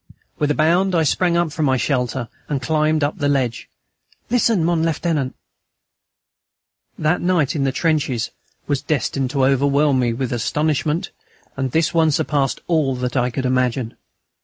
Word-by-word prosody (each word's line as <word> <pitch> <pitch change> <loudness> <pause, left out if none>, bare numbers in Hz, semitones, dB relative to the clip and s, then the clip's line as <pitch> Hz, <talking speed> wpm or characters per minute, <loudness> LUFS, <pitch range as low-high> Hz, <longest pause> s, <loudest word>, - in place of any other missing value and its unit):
With 150 - +1
a 150 - +1
bound, 175 +4 +2
I 165 - +3
sprang 170 +2 +1
from 155 0 -2
my 130 -1 +2
shelter 125 -2 -1 0.2
and 145 -2 0
climbed 155 +3 +1
up 145 +5 -1
the 145 -2 +1
ledge. 130 -5 -1 0.6
"Listen, 230 -7 +2
mon 170 -1 +1
Lieutenant." 160 -4 -1 1.6
That 155 +3 +1
night 175 -6 +1
in 140 -2 0
the 135 - +1
trenches 140 -5 0 0.3
was 145 -2 -1
destined 135 -3 -1
to 135 -1 +1
overwhelm 140 +1 +3
me 120 -2 +1
with 125 +1 -3
astonishment, 150 - -1 0.4
and 135 -1 -2
this 160 +4 +1
one 165 -1 +3
surpassed 140 -2 0
all 155 -6 +1
that 125 0 -3
I 125 -1 +2
could 130 +2 -3
imagine. 125 -2 0
145 Hz, 155 wpm, -20 LUFS, 130-160 Hz, 1.6 s, I